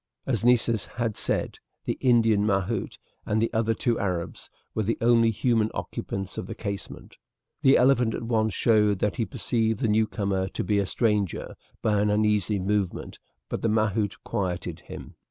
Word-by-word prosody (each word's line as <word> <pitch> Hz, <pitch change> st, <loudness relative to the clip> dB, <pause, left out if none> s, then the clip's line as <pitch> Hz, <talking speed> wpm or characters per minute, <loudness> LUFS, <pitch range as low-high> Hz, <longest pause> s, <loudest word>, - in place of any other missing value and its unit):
As 120 Hz, -5 st, -1 dB
Nessus 115 Hz, -3 st, +3 dB
had 115 Hz, -3 st, -3 dB
said, -, -, -1 dB, 0.3 s
the -, -, -1 dB
Indian 115 Hz, -5 st, +4 dB
mahout 100 Hz, +2 st, -1 dB, 0.3 s
and 105 Hz, -, 0 dB
the 115 Hz, -, 0 dB
other 115 Hz, 0 st, +1 dB
two 120 Hz, +1 st, 0 dB
Arabs 90 Hz, -5 st, -3 dB, 0.2 s
were 110 Hz, -, -1 dB
the 110 Hz, +2 st, -1 dB
only 115 Hz, -1 st, +4 dB
human 115 Hz, 0 st, +1 dB
occupants 95 Hz, -1 st, -5 dB
of 90 Hz, -, -6 dB
the -, -, -6 dB
casemate. 100 Hz, -2 st, -6 dB, 0.4 s
The 135 Hz, -, +6 dB
elephant 125 Hz, -3 st, +3 dB
at -, -, -5 dB
once 110 Hz, -2 st, +1 dB
showed 105 Hz, 0 st, +3 dB
that 100 Hz, -2 st, -1 dB
he 115 Hz, -, 0 dB
perceived 110 Hz, +2 st, 0 dB
the -, -, +1 dB
newcomer 100 Hz, -3 st, 0 dB
to -, -, -4 dB
be 105 Hz, -1 st, +1 dB
a 100 Hz, -, 0 dB
stranger 105 Hz, -2 st, -1 dB, 0.3 s
by 105 Hz, -2 st, +2 dB
an 105 Hz, -, +2 dB
uneasy 105 Hz, 0 st, +2 dB
movement, 100 Hz, -1 st, -2 dB, 0.3 s
but -, -, -4 dB
the 115 Hz, -, +1 dB
mahout 105 Hz, -2 st, +1 dB
quieted 90 Hz, -3 st, -3 dB
him. -, -, -11 dB
110 Hz, 170 wpm, -26 LUFS, 100-115 Hz, 0.4 s, The